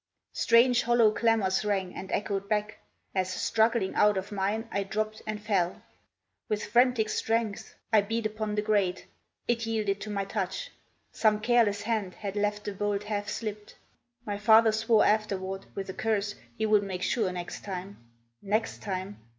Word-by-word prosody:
Strange, 235 +1 +4
hollow 235 -2 +4
clamors 215 -4 +2
rang 195 -3 -1
and 190 - -7
echoed 200 -1 -2
back, 210 0 -1 0.3
As, 185 -1 0
struggling 220 +1 +1
out 210 -1 +4
of 190 +2 -4
mine, 205 +3 -1
I 200 - 0
dropped 215 +2 -3
and 215 0 -3
fell. 195 -5 -1 0.7
With 210 -1 -1
frantic 240 0 +3
strength 225 -1 -1 0.2
I 215 - +7
beat 225 +2 -2
upon 215 -1 -2
the 210 - 0
grate. 200 -4 +1 0.4
It 235 -1 0
yielded 210 -3 -1
to 215 - -5
my 200 -1 -2
touch. 215 - -3 0.4
Some 215 -1 +2
careless 215 -3 +2
hand 210 -5 -2
Had 200 -1 -5
left 210 0 0
the 205 - -3
bolt 205 0 -1
half 210 0 -3
slipped. 210 -2 -5 0.5
My 205 -1 -3
father 220 +1 +6
swore 220 0 +3
Afterward, 195 -3 0
with 195 -1 -4
a 190 - -5
curse, 215 -3 -1 0.2
he 220 - 0
would 210 -1 +4
make 190 -2 -4
sure 215 -7 +1
Next 175 -1 -6
time. 195 0 -6 0.4
NEXT 215 +3 -1
TIME. 190 0 -4
210 Hz, 165 wpm, -28 LUFS, 195-220 Hz, 0.7 s, I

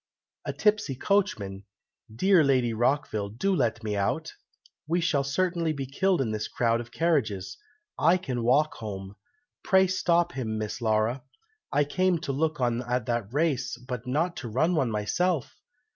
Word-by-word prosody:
"A - - -1
tipsy 210 -10 +1
coachman! 125 - 0 0.5
Dear 180 - +4
Lady 130 -4 +2
Rockville, 110 -3 0
do 190 - 0
let 120 -6 0
me 105 -1 -2
out! 100 -1 -1 0.5
We 170 +3 +1
shall 160 -5 +1
certainly 170 +2 0
be 140 -2 -4
killed 180 +5 +1
in 115 -5 -1
this 105 0 -2
crowd 115 -1 +1
of 120 0 -11
carriages! 110 - 0 0.4
I 170 +4 +5
can 130 -9 -3
walk 145 +6 +3
home! 95 -2 -7 0.5
Pray 190 -1 +5
stop 175 -2 +1
him, 110 -7 -3
Miss 110 +3 -4
Laura! 110 +3 +1 0.5
I 145 - +3
came 185 +4 +1
to 155 - -2
look 155 +2 -1
on 120 -1 +1
at 125 -1 -2
a 120 -4 0
race, 135 -4 0
but 125 0 -7
not 160 +7 0
to 120 - -5
run 155 +10 +1
one 135 -7 +1
myself! 125 - -1
130 Hz, 160 wpm, -27 LUFS, 115-170 Hz, 0.5 s, I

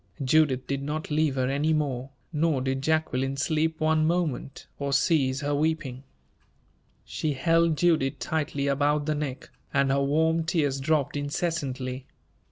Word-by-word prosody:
Judith 135 -2 +3
did 140 0 -2
not 150 +2 -4
leave 150 -2 +1
her 130 -1 0
any 145 +4 +1
more, 135 -4 -1 0.2
nor 155 -2 +1
did 135 +1 -1
Jacqueline 135 -3 0
sleep 155 +2 0
one 155 0 +2
moment, 165 -5 -2
or 140 -1 -2
cease 135 -2 +2
her 145 0 -1
weeping. 145 -4 -1 1.0
She 155 -2 -2
held 165 +3 +2
Judith 150 -5 +2
tightly 145 +2 -2
about 145 +1 +1
the 155 - 0
neck, 145 -3 -5 0.2
and 135 0 +2
her 140 0 +2
warm 160 +4 +2
tears 150 -5 0
dropped 150 0 0
incessantly. 140 -4 -3
145 Hz, 145 wpm, -27 LUFS, 135-160 Hz, 1.0 s, Judith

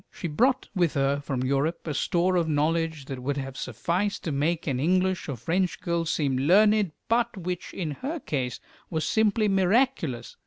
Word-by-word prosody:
She 175 - -5
brought 245 - +1
with 175 -5 +1
her 140 0 +2
from 135 -3 -3
Europe 140 +5 0
a 155 - -2
store 175 +5 +1
of 170 -2 +2
knowledge 160 0 0
that 130 -2 -6
would 140 +2 -2
have 135 -1 -5
sufficed 185 +9 -2
to 160 - -2
make 155 +4 0
an 135 -4 -1
English 185 +3 +1
or 140 - -2
French 175 - -1
girl 170 -1 -1
seem 145 -4 0
learned, 205 +4 +4
but 230 -2 +1
which 180 -1 -4
in 165 -5 -3
her 285 - -4
case 130 - -3 0.3
was 160 -2 -1
simply 215 0 +2
miraculous. 190 - +1
165 Hz, 180 wpm, -26 LUFS, 140-190 Hz, 0.3 s, learned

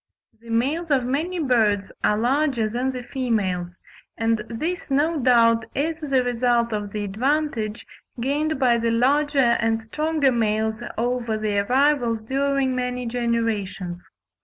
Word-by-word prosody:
The 230 0 -15
males 280 +9 0
of 265 -4 +2
many 315 +8 -1
birds 220 - +1
are 210 - +3
larger 255 0 +1
than 245 +4 -1
the 250 -1 -6
females, 210 -9 -2 0.4
and 225 -1 +1
this 315 +11 -3
no 300 +4 +1
doubt 230 -3 +4
is 315 +3 -1
the 275 -5 +1
result 240 -1 +1
of 205 -1 -3
the 210 0 -3
advantage 230 +1 -1 0.3
gained 295 +5 0
by 245 -3 +3
the 230 0 0
larger 280 +5 +2
and 235 -3 +3
stronger 300 +5 0
males 220 -1 0 0.2
over 235 -1 -1
their 205 -2 0
rivals 255 -4 +2
during 275 0 +1
many 250 0 -2
generations. 225 -7 -2
240 Hz, 135 wpm, -23 LUFS, 225-275 Hz, 0.4 s, doubt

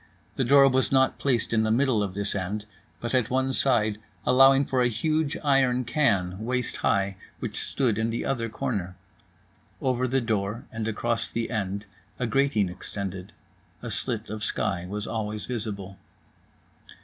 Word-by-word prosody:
The 135 - +1
door 140 +2 +7
was 130 0 +2
not 130 -1 +3
placed 125 -4 0
in 110 - +4
the 110 - +1
middle 120 -1 +3
of 95 -2 -3
this 100 0 -1
end, 100 +2 -3 0.3
but 120 +1 -4
at 125 -3 +2
one 130 +1 +1
side, 110 -6 +2 0.3
allowing 135 +1 +6
for 130 -1 +1
a 125 - +4
huge 155 +6 0
iron 130 -3 +3
can 100 - +1
waist 125 0 -1
high 95 -1 +1 0.2
which - - -3
stood 120 -6 0
in 110 +1 +1
the 115 - -2
other 115 -4 -1
corner. 105 -8 -3 0.8
Over 130 -1 +1
the 135 +2 +2
door 110 -1 -2
and 110 -1 -3
across 115 +1 -1
the 115 0 -3
end, 100 -2 -2 0.3
a 125 - -1
grating 125 -5 +2
extended. 95 +1 -6 0.5
A 120 - -4
slit 110 0 -2
of 110 -1 -4
sky 95 -4 -1
was 105 +1 -3
always 105 -2 -3
visible. 100 -5 -5
115 Hz, 160 wpm, -26 LUFS, 105-130 Hz, 0.8 s, door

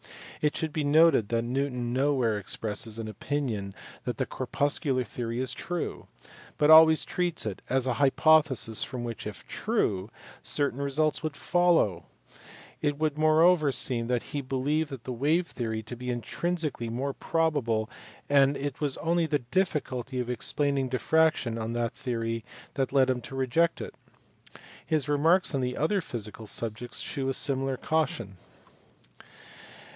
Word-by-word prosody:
It 150 -1 +1
should 160 -2 -3
be 155 - -1
noted 150 -7 +5
that 115 0 +1
Newton 125 -1 -2
nowhere 130 -5 +1
expresses 105 +2 -3
an 115 -1 -5
opinion 110 -3 -3 0.3
that - - -3
the - - 0
corpuscular 140 -2 0
theory 115 +1 -4
is 130 0 0
true, 175 -1 -4 0.5
but 150 +1 +4
always 160 0 +8
treats 175 -6 -1
it 105 -4 -4
as 130 0 +1
an 130 - +1
hypothesis 140 -3 +3
from 125 -2 -5
which, 115 -2 -5
if 105 - -8
true, 110 - -1 0.3
certain 140 -2 0
results 150 +2 0
would 155 -2 -4
follow: 175 - +2 0.8
it 145 -1 0
would 155 -1 -1
moreover 155 0 +5
seem 120 -2 -1
that 125 -1 0
he 145 - -1
believed 140 +4 -1
the 130 - -5
wave 155 +8 +1
theory 110 -7 -4
to 120 +3 -7
be 125 +1 -6
intrinsically 150 +1 -2
more 135 +4 -2
probable, 140 -12 0 0.4
and 140 0 +4
it 140 0 -4
was 145 -3 0
only 165 +1 +1
the 145 -5 -1
difficulty 135 -8 -1
of 125 0 -2
explaining 140 +2 -1
diffraction 130 -3 +2
on 110 +1 -3
that 120 -1 -1
theory 115 -2 -3 0.3
that 135 -2 -1
led 135 -2 +4
him 125 -1 -2
to 135 - -8
reject 135 +6 +1
it. - - -6 0.9
His 155 -3 0
remarks 160 +5 +3
on 125 -2 -1
other 190 +6 +1
physical 110 -6 -6
subjects 115 +3 -4
shew 135 -3 -2
a 135 - -1
similar 135 -2 -1
caution. 130 - -1
135 Hz, 150 wpm, -28 LUFS, 120-155 Hz, 0.9 s, always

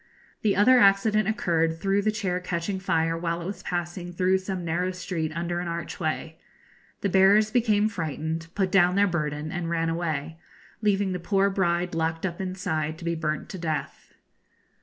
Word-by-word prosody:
The 210 -2 +2
other 250 +6 +6
accident 205 0 +4
occurred 165 -6 +1
through 195 +1 +1
the 215 +1 +1
chair 190 -4 -2
catching 180 +2 -3
fire 165 -3 +1
while 170 0 -2
it 170 - -6
was 195 +3 -5
passing 175 0 -4
through 185 +2 +2
some 185 -2 -4
narrow 175 +3 0
street 180 -3 -3
under 175 +1 -2
an 175 - -4
archway. 165 -1 -4 0.6
The 200 - 0
bearers 200 +3 +5
became 215 -3 +3
frightened, 160 -3 -3
put 190 -2 0
down 180 -1 +4
their 200 +1 +5
burden, 155 -4 -2
and 175 -2 -3
ran 165 -1 0
away, 165 -2 -3 0.4
leaving 200 -2 +2
the 180 - -2
poor 195 +3 +2
bride 175 -2 0
locked 165 +1 -1
up 180 +1 -3
inside 180 -5 -2
to 170 - -9
be 170 - 0
burnt 155 -2 -2
to 190 - -6
death. 160 -2 -4
175 Hz, 175 wpm, -26 LUFS, 165-195 Hz, 0.6 s, other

